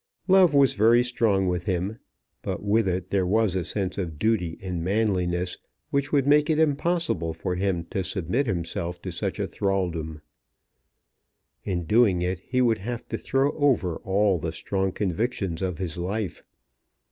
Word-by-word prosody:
Love 185 Hz, -5 st, +5 dB
was 140 Hz, -3 st, +5 dB
very 115 Hz, +3 st, +5 dB
strong 110 Hz, -6 st, +1 dB
with 90 Hz, -1 st, -1 dB
him, 95 Hz, +4 st, -2 dB, 0.4 s
but -, -, -4 dB
with 105 Hz, +1 st, +2 dB
it 90 Hz, 0 st, -2 dB
there 95 Hz, -2 st, +1 dB
was 105 Hz, -1 st, +2 dB
a 95 Hz, -, 0 dB
sense 95 Hz, 0 st, -3 dB
of 85 Hz, -5 st, -4 dB
duty 90 Hz, -3 st, 0 dB
and 90 Hz, -3 st, -4 dB
manliness 90 Hz, -3 st, 0 dB, 0.3 s
which 140 Hz, 0 st, 0 dB
would 140 Hz, -3 st, +3 dB
make 150 Hz, +1 st, +4 dB
it 155 Hz, -, +2 dB
impossible 155 Hz, -, +1 dB
for 90 Hz, +3 st, -3 dB
him 90 Hz, -2 st, -1 dB
to 95 Hz, +2 st, -3 dB
submit 95 Hz, -, -1 dB
himself 85 Hz, -2 st, -3 dB
to 90 Hz, -, -6 dB
such 85 Hz, -, -3 dB
thraldom. 85 Hz, -6 st, -2 dB, 1.5 s
In 90 Hz, -3 st, -1 dB
doing 105 Hz, -3 st, +3 dB
it 90 Hz, 0 st, -1 dB
he 125 Hz, +6 st, 0 dB
would 115 Hz, -2 st, +2 dB
have 120 Hz, +4 st, -5 dB
to -, -, -2 dB
throw 135 Hz, +2 st, +1 dB
over 130 Hz, -, +1 dB
all 95 Hz, -1 st, +1 dB
the 80 Hz, +1 st, -3 dB
strong 95 Hz, +3 st, -1 dB
convictions 100 Hz, -2 st, -2 dB
of 90 Hz, -3 st, -2 dB
his 90 Hz, -3 st, -4 dB
life. 95 Hz, +1 st, -3 dB
95 Hz, 160 wpm, -25 LUFS, 90-115 Hz, 1.5 s, Love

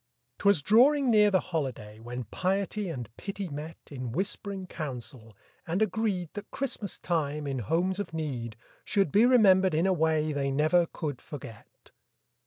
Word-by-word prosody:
'Twas 200 Hz, -8 st, +3 dB
drawing 255 Hz, -, +5 dB
near 210 Hz, -1 st, +6 dB
the 190 Hz, -2 st, +3 dB
holiday, 110 Hz, -9 st, -3 dB
When 120 Hz, +2 st, -6 dB
piety 195 Hz, -, -1 dB
and 125 Hz, -8 st, -5 dB
pity 200 Hz, -2 st, -5 dB
met 155 Hz, +3 st, -7 dB
In 130 Hz, -4 st, -5 dB
whisp'ring 195 Hz, +2 st, -3 dB
council, 120 Hz, -, -7 dB, 0.3 s
and 170 Hz, +3 st, 0 dB
agreed 210 Hz, -4 st, 0 dB
That 205 Hz, 0 st, -7 dB
Christmas 240 Hz, -7 st, -4 dB
time, 150 Hz, -3 st, -1 dB
in 135 Hz, -2 st, -2 dB
homes 175 Hz, -, 0 dB
of 200 Hz, -4 st, -4 dB
need, 130 Hz, -9 st, -4 dB, 0.3 s
Should 195 Hz, -8 st, +1 dB
be 220 Hz, +4 st, +5 dB
remembered 190 Hz, -8 st, +5 dB
in 165 Hz, +3 st, +2 dB
a 190 Hz, -, +3 dB
way 155 Hz, -2 st, +1 dB
They 140 Hz, -1 st, -1 dB
never 155 Hz, +5 st, +3 dB
could 145 Hz, -7 st, -5 dB
forget. 120 Hz, -7 st, -11 dB
165 Hz, 155 wpm, -29 LUFS, 140-200 Hz, 0.3 s, near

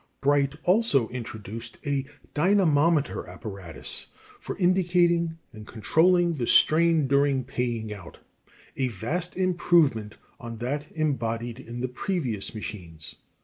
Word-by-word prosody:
] -, -, -45 dB
Bright 140 Hz, 0 st, +2 dB
also 180 Hz, -, +3 dB
introduced 115 Hz, -2 st, -7 dB
a 140 Hz, -1 st, -1 dB, 0.3 s
dynamometer 160 Hz, -3 st, +2 dB
apparatus 95 Hz, -7 st, -3 dB, 0.3 s
for -, -, -6 dB
indicating 175 Hz, -3 st, +2 dB, 0.2 s
and 110 Hz, -1 st, -11 dB
controlling 170 Hz, -, +3 dB
the 125 Hz, -7 st, -3 dB
strain 165 Hz, -1 st, +4 dB
during 140 Hz, -1 st, +2 dB
paying 120 Hz, -4 st, -3 dB
out 95 Hz, -5 st, -11 dB, 0.6 s
a 130 Hz, -, 0 dB
vast 145 Hz, -, -3 dB
improvement 170 Hz, -, +2 dB, 0.2 s
on 115 Hz, -1 st, -7 dB
that 140 Hz, +6 st, -3 dB
embodied 120 Hz, -6 st, -2 dB
in 120 Hz, +1 st, -7 dB
the 130 Hz, -, 0 dB
previous 125 Hz, -, -3 dB
machines. 85 Hz, -7 st, -7 dB
135 Hz, 115 wpm, -26 LUFS, 115-170 Hz, 0.6 s, strain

